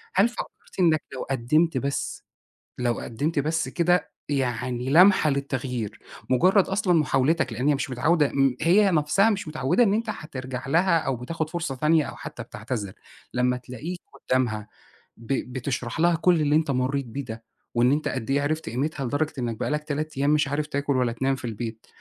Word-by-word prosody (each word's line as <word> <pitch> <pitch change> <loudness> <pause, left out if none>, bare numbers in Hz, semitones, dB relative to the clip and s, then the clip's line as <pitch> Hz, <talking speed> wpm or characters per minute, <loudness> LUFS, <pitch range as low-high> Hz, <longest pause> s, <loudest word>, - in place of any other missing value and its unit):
هل 200 +5 +5
فكرت 240 - -9
إنك 160 -4 +4
لو 130 - -5
قدّمت 135 +5 +2
بس، 140 +2 -3 0.5
لو 120 -1 0
قدّمت 145 +7 -2
بس 155 -1 0
كده 175 +6 +1 0.2
يعني 125 -2 -1
لمحة 180 +1 +6
للتغيير، 130 -5 -3 0.3
مجرد 185 - +4
أصلًا 190 -2 +1
محاولتك 145 -4 +2
لإن 125 +6 -1
هي 150 - +4
مش 135 - -3
متعودة 145 +4 +2
م 135 -2 +3
هي 190 +4 +5
نَفْسها 165 +7 +3
مش 205 -6 -2
متعودة 155 - +2
إن 200 -2 +3
أنت 225 +1 -1
هترجَع 130 -8 -6
لها 170 +3 +3
أو 135 - -1
بتاخد 155 +6 -4
فرصة 170 -5 -3
تانية 155 +3 +3
أو - - -7
حتى - - -8
بتعتذر. 105 -3 -5 0.4
لمّا 125 0 +1
تلاقيك 145 +9 -7 0.3
قدامها 110 -5 +1 0.5
ب 115 +4 -3 0.2
بتشرَح 125 +1 -3
لها 170 0 +4
كُلّ 170 -1 +3
اللي 145 0 +2
أنت 155 -3 +2
مريت 130 +1 0
بيه 135 +5 -5
ده، 110 0 -8 0.3
وإن 120 +2 +4
أنت 150 +2 0
قد 110 - -3
إيه 140 +1 +2
عِرفت 155 -3 -2
قيمتها 140 +3 -2
لدرجة 150 +5 -1
إنك 115 -3 -2
بقى - - -1
لك 150 0 -1
3 150 -1 -4
أيام 140 +1 +2
مش 150 -2 +3
عارف 150 +2 -1
تاكل 140 -2 -1
ولا 125 -2 +1
تنام 135 +3 0
في 130 - -8
البيت، 115 0 -6
140 Hz, 185 wpm, -25 LUFS, 125-160 Hz, 0.5 s, لمحة